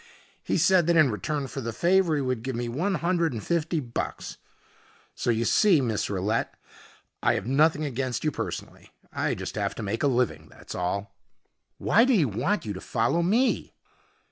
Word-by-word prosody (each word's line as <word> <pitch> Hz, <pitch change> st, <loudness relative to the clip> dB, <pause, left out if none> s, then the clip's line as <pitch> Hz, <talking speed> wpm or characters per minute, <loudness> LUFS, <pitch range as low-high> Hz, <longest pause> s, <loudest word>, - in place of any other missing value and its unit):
He -, -, -1 dB
said 175 Hz, 0 st, +4 dB
that 170 Hz, -, +3 dB
in 155 Hz, -6 st, +5 dB
return 140 Hz, +8 st, -2 dB
for 135 Hz, +1 st, -6 dB
the 115 Hz, -1 st, -3 dB
favor 175 Hz, -, +2 dB
he 145 Hz, -, 0 dB
would 130 Hz, -3 st, -1 dB
give 130 Hz, +1 st, -4 dB
me 120 Hz, 0 st, -2 dB
one 170 Hz, +12 st, -1 dB
hundred 170 Hz, -3 st, 0 dB
and 110 Hz, -, -5 dB
fifty 170 Hz, -1 st, 0 dB
bucks. 120 Hz, -5 st, -5 dB, 0.8 s
So -, -, -3 dB
you 115 Hz, 0 st, +1 dB
see, 195 Hz, -, +4 dB
Miss 115 Hz, -5 st, -1 dB
Rillette, 100 Hz, +3 st, -1 dB, 0.7 s
I -, -, +3 dB
have -, -, -3 dB
nothing 150 Hz, +4 st, +2 dB
against 130 Hz, -2 st, -3 dB
you 155 Hz, -, +1 dB
personally. -, -, -6 dB, 0.2 s
I -, -, -1 dB
just -, -, -6 dB
have -, -, -2 dB
to -, -, -5 dB
make 105 Hz, +3 st, -3 dB
a -, -, +3 dB
living, 120 Hz, -, 0 dB
that's -, -, -11 dB
all." 100 Hz, +3 st, -3 dB, 0.6 s
"Why 225 Hz, +6 st, +4 dB
did 260 Hz, -1 st, +3 dB
he 170 Hz, -8 st, +4 dB
want 125 Hz, -, -1 dB
you 105 Hz, -, -3 dB
to 95 Hz, -, -8 dB
follow 120 Hz, +8 st, 0 dB
me?" 225 Hz, +9 st, +1 dB
135 Hz, 190 wpm, -26 LUFS, 115-170 Hz, 0.8 s, in